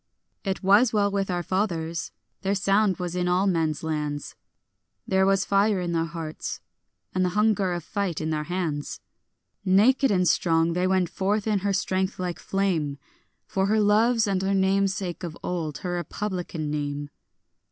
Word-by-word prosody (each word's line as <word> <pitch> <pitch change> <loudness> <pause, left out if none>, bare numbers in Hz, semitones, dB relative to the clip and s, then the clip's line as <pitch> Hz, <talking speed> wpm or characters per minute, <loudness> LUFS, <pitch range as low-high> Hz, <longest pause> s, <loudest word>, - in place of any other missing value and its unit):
It 195 0 -3
was 205 +5 +5
well 205 -2 +2
with 195 -1 -1
our 175 -1 -1
fathers; 170 -4 -2 0.3
their 200 +1 0
sound 195 0 +2
was 180 -1 -4
in 180 0 0
all 180 +2 +2
men's 165 -5 0
lands; 150 -2 -3 0.7
There 190 0 +2
was 195 0 +2
fire 200 0 +2
in 175 -1 -2
their 165 -1 +1
hearts, 165 -1 -5 0.5
and 185 - +1
the 180 - +2
hunger 210 -3 +2
of 175 -2 -3
fight 195 -3 -2
in 160 0 -2
their 150 -1 -1
hands. 165 -5 -3 0.6
Naked 220 +9 +4
and 180 -3 +2
strong 165 0 +2
they 180 +1 +1
went 185 -2 +2
forth 200 +2 0
in 210 -2 +1
her 200 +1 0
strength 190 0 -1
like 180 -2 -3
flame, 170 -8 -1 0.5
For 190 0 0
her 215 +2 +3
love's 220 +3 +4
and 195 -2 0
her 195 +1 +1
name's 195 0 +2
sake 180 -3 -4
of 170 -2 -6
old, 160 -5 -3
her 180 - -1
republican 175 -3 -3
name. 145 -1 -3
185 Hz, 170 wpm, -25 LUFS, 165-200 Hz, 0.7 s, was